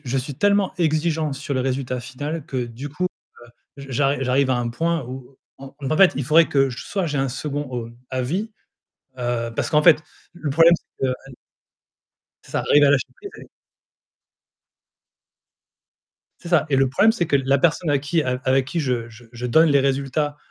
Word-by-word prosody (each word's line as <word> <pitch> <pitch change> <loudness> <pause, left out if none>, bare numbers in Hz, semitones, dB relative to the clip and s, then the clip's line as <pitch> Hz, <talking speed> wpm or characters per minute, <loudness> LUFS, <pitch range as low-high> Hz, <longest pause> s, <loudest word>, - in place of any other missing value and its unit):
je 135 +1 -1
suis 135 +2 -5
tellement 200 +4 +2
exigeant 155 -1 0
sur 140 +1 -5
le 130 - 0
résultat 130 -1 -2
final 145 +5 -5
que 130 -2 -2
du 120 +5 -8
coup, 150 +6 -4 0.7
heu, - - -8
j - - -10
j'arri 135 +2 +1
j'arrive 130 +1 +2
à 130 - +2
un 120 -1 -2
point 165 +6 -1
où 130 +1 -9 0.2
en 135 0 -11
donc 140 +2 -2
en - - +1
fait, 195 +1 +6
il 140 - -2
faudrait 155 +4 +5
que 135 -2 +2
j 120 - -8
soit 195 -4 -2
j'ai 145 -2 -2
un 135 0 0
2nd, 140 0 -4
heu, 115 - -14 0.2
avis, 145 - -2 0.7
heu, 120 -1 -2
parce - - -1
qu'en 150 -1 +3
fait, 165 -1 +7 0.4
l 175 - -15
le 145 - -1
problème, 165 +4 +6
c'est 135 - -6
que 130 - 0
aller 135 - -13 1.1
ça - - -3
arrive 145 0 +4
à 140 - +5
lâcher 140 -2 +2
prise 400 0 -10
et - - -13 2.9
C'est 175 - -9
ça 170 -4 +3
et 140 - +2
le 135 0 +3
problème, 200 - +4
c'est 220 -7 -1
que 145 - -1
la 135 0 +2
personne 165 +1 +1
à 145 - +3
qui 155 +4 0
a 125 -2 -2
avec 130 0 +2
qui 150 +6 -4
je 125 -6 -1
je 115 +1 -15
je 120 +1 -5
donne 160 +7 +4
les 140 - +4
résultats, 140 +2 -1
140 Hz, 200 wpm, -22 LUFS, 130-155 Hz, 2.9 s, fait